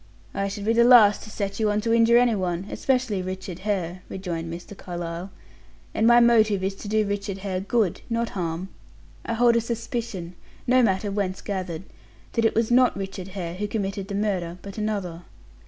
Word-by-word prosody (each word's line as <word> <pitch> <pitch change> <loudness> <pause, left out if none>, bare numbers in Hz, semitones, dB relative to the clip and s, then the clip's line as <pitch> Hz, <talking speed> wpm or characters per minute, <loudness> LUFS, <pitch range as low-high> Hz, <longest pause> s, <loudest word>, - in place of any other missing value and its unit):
"I 200 - -1
should 200 +1 -5
be 225 - +3
the 235 +1 +5
last 235 -4 +7
to - - -10
set 200 -1 -4
you 215 -1 +2
on 210 0 +1
to 230 +1 +1
injure 230 0 +5
any 245 -1 +4
one, 180 -2 -2
especially 250 -7 0
Richard 185 -1 -6
Hare," 185 -3 -2
rejoined 170 -3 -4
Mr. 175 +4 -8
Carlyle; 175 0 -6 0.6
"and 220 - +2
my 240 0 +7
motive 220 -5 +4
is 195 +1 0
to 205 - -8
do 215 0 +2
Richard 200 -1 -3
Hare 185 -2 -1
good, 200 -1 0
not 230 0 0
harm. 175 0 -4 0.5
I - - -3
hold 235 0 +4
a - - +2
suspicion, 230 -6 -4 0.3
no 255 +1 +4
matter 200 -2 +1
whence 195 -2 -2
gathered, 185 -4 -4 0.5
that 230 -2 +1
it 225 - +2
was 230 +1 +1
not 250 -2 +4
Richard 195 -1 -5
Hare 170 -2 -3
who 205 +3 -3
committed 195 -2 -3
the 200 - -4
murder, 185 -4 -1
but 200 +2 -7
another. 200 -6 -3
200 Hz, 190 wpm, -25 LUFS, 185-225 Hz, 0.6 s, last